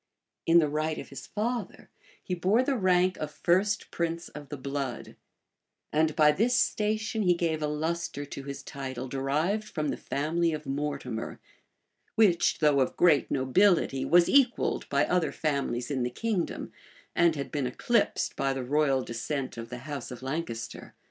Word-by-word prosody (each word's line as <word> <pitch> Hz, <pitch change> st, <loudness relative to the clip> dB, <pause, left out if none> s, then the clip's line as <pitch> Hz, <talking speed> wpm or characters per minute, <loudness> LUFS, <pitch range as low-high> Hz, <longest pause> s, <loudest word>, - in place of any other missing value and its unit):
[*] -, -, -60 dB
In 165 Hz, +1 st, +6 dB
the 160 Hz, -3 st, +5 dB
right 155 Hz, +1 st, -1 dB
of -, -, -7 dB
his -, -, -9 dB
father, 235 Hz, +3 st, -3 dB, 0.3 s
he 185 Hz, -, -3 dB
bore 190 Hz, +8 st, +2 dB
the 275 Hz, +1 st, 0 dB
rank 185 Hz, -3 st, +3 dB
of 155 Hz, -, -4 dB
first 190 Hz, +6 st, +1 dB
prince 170 Hz, 0 st, -2 dB
of 145 Hz, -2 st, -10 dB
the 145 Hz, -, -5 dB
blood; 135 Hz, -2 st, -4 dB, 0.8 s
and 155 Hz, 0 st, +2 dB
by 150 Hz, -2 st, +6 dB
this 225 Hz, +10 st, +2 dB
station 215 Hz, +1 st, 0 dB
he 180 Hz, -3 st, +4 dB
gave 165 Hz, -2 st, -1 dB
a 150 Hz, -, 0 dB
lustre 155 Hz, -1 st, -2 dB
to 140 Hz, -, -7 dB
his 140 Hz, 0 st, -6 dB
title 130 Hz, -2 st, -6 dB
derived 150 Hz, +11 st, 0 dB
from 155 Hz, -7 st, -3 dB
the -, -, -2 dB
family 165 Hz, +3 st, 0 dB
of 150 Hz, 0 st, -5 dB
Mortimer, 140 Hz, -4 st, -3 dB, 0.8 s
which, 195 Hz, -6 st, +4 dB
though 150 Hz, -3 st, +3 dB
of 130 Hz, -, 0 dB
great 160 Hz, -6 st, +4 dB
nobility, 135 Hz, 0 st, +3 dB
was 175 Hz, 0 st, +5 dB
equalled 270 Hz, -3 st, +2 dB
by 140 Hz, +1 st, +3 dB
other 180 Hz, -2 st, +1 dB
families 140 Hz, -5 st, -2 dB
in 135 Hz, -2 st, -1 dB
the 120 Hz, -, 0 dB
kingdom, 205 Hz, -, -2 dB, 0.4 s
and 170 Hz, -2 st, +4 dB
had 140 Hz, -1 st, -5 dB
been 140 Hz, -4 st, -1 dB
eclipsed 235 Hz, -, 0 dB
by 135 Hz, 0 st, 0 dB
the 135 Hz, -1 st, -3 dB
royal 135 Hz, 0 st, +2 dB
descent 130 Hz, +4 st, -4 dB
of 115 Hz, -1 st, -7 dB
the 125 Hz, -, -6 dB
house 145 Hz, -5 st, -5 dB
of 125 Hz, 0 st, -9 dB
Lancaster. 130 Hz, -5 st, -5 dB
150 Hz, 170 wpm, -28 LUFS, 135-180 Hz, 0.8 s, In